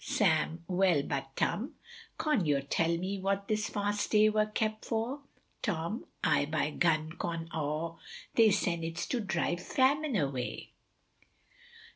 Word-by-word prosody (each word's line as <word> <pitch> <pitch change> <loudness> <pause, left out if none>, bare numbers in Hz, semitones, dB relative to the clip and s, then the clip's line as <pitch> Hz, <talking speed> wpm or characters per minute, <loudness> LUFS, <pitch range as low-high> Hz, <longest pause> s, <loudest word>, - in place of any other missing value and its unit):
Sam 170 - +1
Well 180 -5 +3
but 135 -1 -4
Tum, 240 +6 -1 0.4
con 305 - +1
yor 145 -3 +2
tell 165 +4 +1
me 190 +3 -3
what 195 +1 -1
this 215 -1 0
fast 205 0 -1
day 215 0 +5
wur 215 0 +2
kept 215 0 -1
for. 235 +5 -2 0.4
Tom 175 +1 -2 0.2
Aye 150 -2 +3
by 155 0 0
gum 155 -1 +1
con 165 0 -4
aw, 160 +2 -2 0.3
they 225 -2 +6
sen 170 -4 +1
it's 165 +1 -3
to 250 - -1
drive 175 -4 -1
famine 280 +4 +2
away. 135 -8 -2
180 Hz, 140 wpm, -31 LUFS, 160-215 Hz, 0.4 s, they